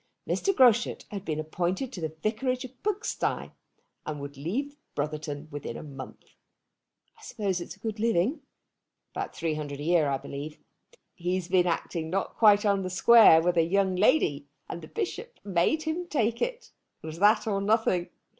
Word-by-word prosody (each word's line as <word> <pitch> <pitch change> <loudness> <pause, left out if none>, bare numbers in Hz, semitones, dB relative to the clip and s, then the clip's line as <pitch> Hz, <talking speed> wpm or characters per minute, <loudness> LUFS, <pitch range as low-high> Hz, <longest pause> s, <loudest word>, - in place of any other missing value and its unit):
Mr. 390 - +1
Groschut 245 - +3
had 200 -2 -5
been 155 -4 -3
appointed 180 - -2
to 180 - -6
the 160 -1 -2
vicarage 255 +4 -1
of 255 - -11
Pugsty, 420 +2 -2 0.5
and 150 -1 -5
would 140 0 -7
leave 235 - -3 0.2
Brotherton 150 0 -4
within 145 -5 -6
a - - -8
month. 135 -3 -11 0.9
"I - - -20
suppose 200 - -2
it's 175 - -7
a - - -27
good 220 0 -4
living." 230 - +1 0.7
"About - - -4
£300 150 -3 -3
a - - -5
year, 165 -2 +3
I 135 - 0
believe. 145 +3 -7 0.6
He's 180 0 -2
been 180 -1 +3
acting 165 -1 -2
not 195 +3 -2
quite 210 -2 +5
on 200 -1 +2
the 185 - -3
square 185 -3 +7
with 175 0 +1
a - - +6
young 190 +2 +1
lady, 180 - +2 0.2
and 170 - -6
the - - -10
Bishop 455 +3 -5
made 200 - +1
him 330 +3 -3
take 235 -6 0
it. - - -3 0.3
It - - -8
was 160 +1 -7
that 210 +2 +4
or 200 -3 0
nothing." 200 -4 +1
185 Hz, 175 wpm, -28 LUFS, 160-235 Hz, 0.9 s, square